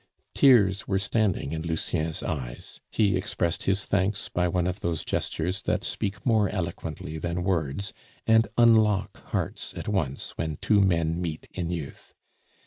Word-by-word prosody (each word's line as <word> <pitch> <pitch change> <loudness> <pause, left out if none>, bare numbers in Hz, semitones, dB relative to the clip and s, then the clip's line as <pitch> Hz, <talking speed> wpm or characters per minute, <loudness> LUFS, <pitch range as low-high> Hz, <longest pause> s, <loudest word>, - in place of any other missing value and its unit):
Tears 100 -8 +5
were 95 - +1
standing 100 -6 0
in 80 0 -3
Lucien's 80 -1 -1
eyes; 65 -6 -5
he 105 -3 +2
expressed 90 -3 -1
his 95 0 +2
thanks 100 +1 0
by 90 0 +1
one 90 0 0
of 90 +2 -2
those 85 -5 -2
gestures 90 +5 -1
that - - -1
speak 100 0 -3
more 110 -5 +3
eloquently 80 -4 -4
than 85 +2 -2
words, 90 0 -1 0.3
and 115 0 +5
unlock 110 -4 +4
hearts - - -3
at - - -6
once 80 -10 -1
when 80 -2 -2
two 105 -2 +3
men 85 -3 +2
meet 80 -3 -4
in 85 -2 -3
youth. 85 -5 -6
90 Hz, 150 wpm, -27 LUFS, 80-100 Hz, 0.3 s, Tears